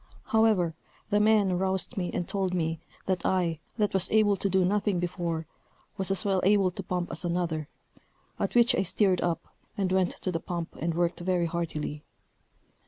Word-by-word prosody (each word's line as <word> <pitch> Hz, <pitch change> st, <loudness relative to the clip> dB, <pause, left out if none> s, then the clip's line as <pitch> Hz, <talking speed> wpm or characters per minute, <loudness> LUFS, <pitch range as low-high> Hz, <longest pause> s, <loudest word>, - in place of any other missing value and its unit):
However, 215 Hz, -7 st, +3 dB, 0.4 s
the 205 Hz, -, +4 dB
men 210 Hz, -4 st, +3 dB
roused 190 Hz, +5 st, -1 dB
me, 180 Hz, -4 st, -2 dB
and 175 Hz, -, -3 dB
told 190 Hz, -2 st, -1 dB
me, 165 Hz, -2 st, -1 dB, 0.3 s
that 185 Hz, -2 st, -1 dB
I, 170 Hz, -4 st, +1 dB, 0.2 s
that 210 Hz, -2 st, +1 dB
was 190 Hz, -1 st, +4 dB
able 210 Hz, -2 st, +4 dB
to 195 Hz, -, -1 dB
do 190 Hz, -1 st, +3 dB
nothing 200 Hz, -1 st, +1 dB
before, 170 Hz, -2 st, -2 dB, 0.5 s
was 190 Hz, 0 st, -2 dB
as 195 Hz, +2 st, +1 dB
well 190 Hz, -2 st, +2 dB
able 195 Hz, -1 st, +4 dB
to 185 Hz, -, -6 dB
pump 180 Hz, -1 st, -3 dB
as 165 Hz, -, -3 dB
another; 170 Hz, -3 st, -1 dB, 0.7 s
at -, -, -2 dB
which 240 Hz, 0 st, +6 dB
I -, -, +2 dB
stirred 190 Hz, 0 st, +2 dB
up, 170 Hz, -1 st, -1 dB, 0.3 s
and 190 Hz, -2 st, 0 dB
went 185 Hz, -1 st, +2 dB
to 185 Hz, -, 0 dB
the 165 Hz, -, -1 dB
pump, 170 Hz, -1 st, -5 dB
and 165 Hz, 0 st, -2 dB
worked 175 Hz, 0 st, 0 dB
very 175 Hz, -1 st, +1 dB
heartily. 160 Hz, -3 st, -3 dB
185 Hz, 180 wpm, -28 LUFS, 170-195 Hz, 0.7 s, which